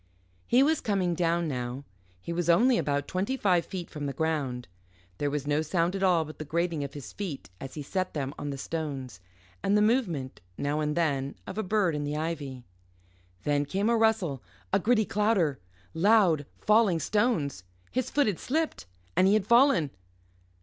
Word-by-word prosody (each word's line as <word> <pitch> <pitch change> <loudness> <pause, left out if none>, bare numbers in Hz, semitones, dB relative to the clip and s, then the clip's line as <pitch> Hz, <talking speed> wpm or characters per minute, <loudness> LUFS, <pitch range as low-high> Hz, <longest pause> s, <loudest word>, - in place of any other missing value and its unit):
He 250 +3 +5
was 310 +2 +2
coming 195 -5 0
down 170 0 +1
now. 125 -1 -4 0.4
He 170 - -5
was 175 0 -1
only 235 +8 +5
about 145 -1 -1
twenty 195 +8 -1
five 180 -7 +2
feet 180 -3 -5
from 145 -2 -4
the 140 - -3
ground. 140 -7 -2 0.5
There 145 - 0
was 145 -1 -3
no 145 +1 +1
sound 170 +3 0
at 195 - -3
all 175 -4 +3
but 155 - -11
the - - -3
grating 165 0 -1
of 140 +1 -7
his 145 -4 -8
feet 170 - -6
as 135 - -8
he 150 - -5
set 185 +5 -2
them 140 -2 -2
on 145 - -5
the 140 - -4
stones, 135 - -5 0.4
and 205 +1 +2
the - - +4
movement, 185 - 0 0.2
now 145 +2 -1
and 150 0 -1
then, 140 -5 0
of 195 - -5
a - - +2
bird 200 -3 +1
in 150 0 -2
the 145 +1 -2
ivy. 145 -6 -4 0.8
Then 145 -1 +1
came 195 +9 0
a - - +4
rustle, 220 - +1 0.3
a - - +5
gritty 220 +1 +3
clatter, 200 -10 +1 0.3
loud 175 -6 +4
falling 210 -5 +3
stones: 170 - 0 0.3
his 255 0 -1
foot 290 - +2
had 205 -5 -1
slipped, 310 - -2 0.3
and 185 - +5
he 200 - +5
had 215 -3 +1
fallen. 235 - +4
170 Hz, 185 wpm, -28 LUFS, 145-210 Hz, 0.8 s, He